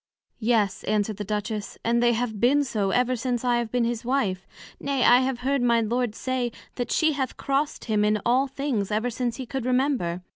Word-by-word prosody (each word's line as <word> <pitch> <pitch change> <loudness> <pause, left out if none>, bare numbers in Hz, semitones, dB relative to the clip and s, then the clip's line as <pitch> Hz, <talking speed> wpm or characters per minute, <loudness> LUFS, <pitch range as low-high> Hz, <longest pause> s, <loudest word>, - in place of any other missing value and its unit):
Yes, 215 -4 +1
answered 210 -1 0
the 210 - -3
Duchess, 210 +1 -4
and 235 +1 +2
they 240 0 +4
have 225 -2 -2
been 275 +6 +4
so 215 -7 -1
ever 250 +5 +2
since 245 0 -2
I 245 -1 +3
have 235 -2 -2
been 245 -1 +1
his 235 -1 -2
Wife: 235 -8 -1 0.3
nay, 275 -2 0
I 245 +1 +7
have 260 -1 -1
heard 275 +1 +1
my 235 -1 +3
Lord 235 0 -1
say, 255 -2 -2 0.2
That 245 - -4
she 315 -1 +3
hath 265 -3 -3
crossed 280 +1 -1
him 215 -2 +1
in 210 0 +2
all 255 +3 +3
things, 265 -7 -2
ever 220 +3 0
since 240 0 -2
he 260 - -6
could 265 +1 -4
remember. 250 -9 0
240 Hz, 210 wpm, -25 LUFS, 215-255 Hz, 0.3 s, I